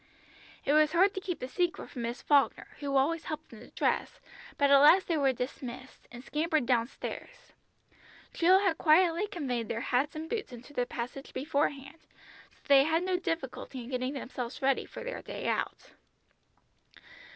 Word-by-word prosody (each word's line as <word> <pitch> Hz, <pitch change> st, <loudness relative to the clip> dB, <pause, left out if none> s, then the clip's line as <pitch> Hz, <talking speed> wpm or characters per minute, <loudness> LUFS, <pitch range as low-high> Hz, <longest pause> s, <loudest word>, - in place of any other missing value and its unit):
It 285 Hz, -, +2 dB
was 305 Hz, +1 st, +4 dB
hard 380 Hz, +3 st, +4 dB
to 380 Hz, -, -4 dB
keep 360 Hz, -3 st, -3 dB
the 255 Hz, -, -5 dB
secret 350 Hz, +6 st, -2 dB
from 245 Hz, -, -6 dB
Miss 235 Hz, +2 st, -4 dB
Falkner, 285 Hz, -2 st, +2 dB
who 280 Hz, -2 st, 0 dB
always 315 Hz, +5 st, +1 dB
helped 310 Hz, -1 st, -6 dB
them 225 Hz, -, -12 dB
to -, -, -13 dB
dress, -, -, -1 dB, 0.4 s
but 280 Hz, -1 st, +3 dB
at 280 Hz, -, +8 dB
last 335 Hz, +7 st, +6 dB
they 335 Hz, -, +1 dB
were 275 Hz, -3 st, +3 dB
dismissed, 255 Hz, 0 st, -7 dB
and 240 Hz, +1 st, -10 dB
scampered 310 Hz, -1 st, 0 dB
down 235 Hz, -2 st, +2 dB
stairs. -, -, -9 dB, 0.8 s
Jill 370 Hz, +3 st, +5 dB
had 380 Hz, -5 st, +1 dB
quietly 340 Hz, +4 st, +4 dB
conveyed 260 Hz, -, -3 dB
their 230 Hz, -, -2 dB
hats 265 Hz, +5 st, 0 dB
and 315 Hz, +1 st, -5 dB
boots 430 Hz, -, -4 dB
into 245 Hz, +4 st, -11 dB
the 245 Hz, -3 st, -1 dB
passage 250 Hz, +3 st, -6 dB
before 285 Hz, +2 st, +1 dB
hand, 275 Hz, +3 st, -12 dB, 0.5 s
so -, -, -29 dB
they 275 Hz, -1 st, +7 dB
had 325 Hz, +2 st, +1 dB
no 370 Hz, 0 st, 0 dB
difficulty 275 Hz, -7 st, -4 dB
in 240 Hz, -, -10 dB
getting 255 Hz, +1 st, -2 dB
themselves 250 Hz, -2 st, -6 dB
ready 270 Hz, 0 st, +2 dB
for -, -, -9 dB
their -, -, -5 dB
day -, -, -6 dB
out. -, -, -2 dB
285 Hz, 180 wpm, -30 LUFS, 255-335 Hz, 0.8 s, at